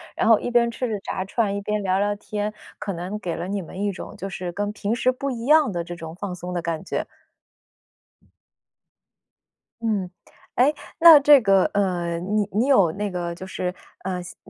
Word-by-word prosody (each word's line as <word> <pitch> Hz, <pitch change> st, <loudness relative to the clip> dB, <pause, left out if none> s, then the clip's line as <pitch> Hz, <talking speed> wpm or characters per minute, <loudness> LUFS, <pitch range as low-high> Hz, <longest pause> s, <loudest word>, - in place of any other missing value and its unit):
然 -, -, +1 dB
后 225 Hz, -2 st, +6 dB
一 245 Hz, -, -4 dB
边 235 Hz, -1 st, +4 dB
吃 240 Hz, +1 st, -3 dB
着 210 Hz, -2 st, -2 dB
炸 190 Hz, -, -4 dB
串， 200 Hz, +1 st, -1 dB
一 200 Hz, -, -3 dB
边 210 Hz, +1 st, -2 dB
聊 190 Hz, 0 st, +1 dB
聊 205 Hz, +1 st, +1 dB
天， 210 Hz, 0 st, -4 dB, 0.3 s
可 210 Hz, -1 st, -3 dB
能 180 Hz, +4 st, -5 dB
给 175 Hz, -5 st, -3 dB
了 170 Hz, -, -4 dB
你 200 Hz, +1 st, -2 dB
们 185 Hz, +3 st, -8 dB
一 205 Hz, 0 st, 0 dB
种 195 Hz, -, -9 dB
就 195 Hz, -, -5 dB
是 180 Hz, -2 st, -5 dB
跟 205 Hz, +3 st, -2 dB
平 210 Hz, +1 st, -2 dB
时 250 Hz, +2 st, +2 dB
不 275 Hz, +2 st, -4 dB
一 235 Hz, -2 st, -5 dB
样 300 Hz, -3 st, +5 dB
的 175 Hz, -2 st, -2 dB
这 175 Hz, +1 st, -7 dB
种 160 Hz, -1 st, -8 dB
放 185 Hz, 0 st, -5 dB
松 180 Hz, +1 st, -6 dB
的 175 Hz, -, -1 dB
感 165 Hz, -1 st, -3 dB
觉。 -, -, -3 dB, 2.7 s
嗯。 210 Hz, -5 st, -1 dB, 0.5 s
诶， 265 Hz, +5 st, +4 dB, 0.3 s
那 330 Hz, -3 st, +10 dB
这 290 Hz, 0 st, +7 dB
个， 195 Hz, -3 st, +4 dB
呃， 175 Hz, -4 st, 0 dB
你 205 Hz, +3 st, -1 dB
你 215 Hz, +6 st, +1 dB
有 200 Hz, -, +4 dB
那 205 Hz, +1 st, -3 dB
个 175 Hz, -1 st, -3 dB
就 185 Hz, -, -8 dB
是， 180 Hz, -1 st, -4 dB, 0.3 s
呃， 180 Hz, -1 st, -3 dB
像 180 Hz, -, -11 dB
200 Hz, 215 characters per minute, -23 LUFS, 180-220 Hz, 2.7 s, 那